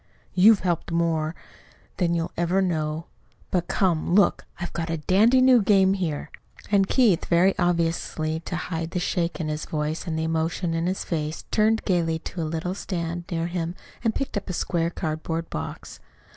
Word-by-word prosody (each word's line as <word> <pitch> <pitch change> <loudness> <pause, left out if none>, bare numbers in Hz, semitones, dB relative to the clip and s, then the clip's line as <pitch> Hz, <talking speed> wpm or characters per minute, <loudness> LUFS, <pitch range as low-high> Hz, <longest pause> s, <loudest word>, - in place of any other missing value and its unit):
"You've 200 +3 +6
helped 175 -2 -1
more 165 -1 0 0.6
than 170 -2 +1
you'll 165 -1 -2
ever 175 +3 +1
know. 160 -3 -1 0.5
But, 175 -2 0
come 175 -2 +1
look! 205 - +3
I've 175 - -5
got 170 -1 -3
a 165 - -1
dandy 215 - +4
new 255 -2 +6
game 195 -1 +4
here." 170 -7 -3 0.4
And 195 -2 +4
Keith, 215 -9 +3
very 180 +3 +4
obviously 165 -2 0
to 170 - -5
hide 165 -1 -3
the 180 - -2
shake 175 -1 -1
in 160 - -2
his 150 0 -3
voice 155 +3 -3
and 160 -1 -2
the 160 - -1
emotion 165 +2 -1
in 165 +1 0
his 185 +1 -1
face, 155 -2 -3
turned 220 +1 +2
gayly 170 -4 +1
to 170 +2 -6
a 155 - -2
little 165 +3 -2
stand 175 -3 -4
near 165 -2 -1
him 170 0 -3 0.3
and 225 -2 +1
picked 275 - -3
up 200 - -5
a - - -2
square 170 -1 0
cardboard 165 0 -3
box. 75 - -6
170 Hz, 180 wpm, -25 LUFS, 165-185 Hz, 0.6 s, You've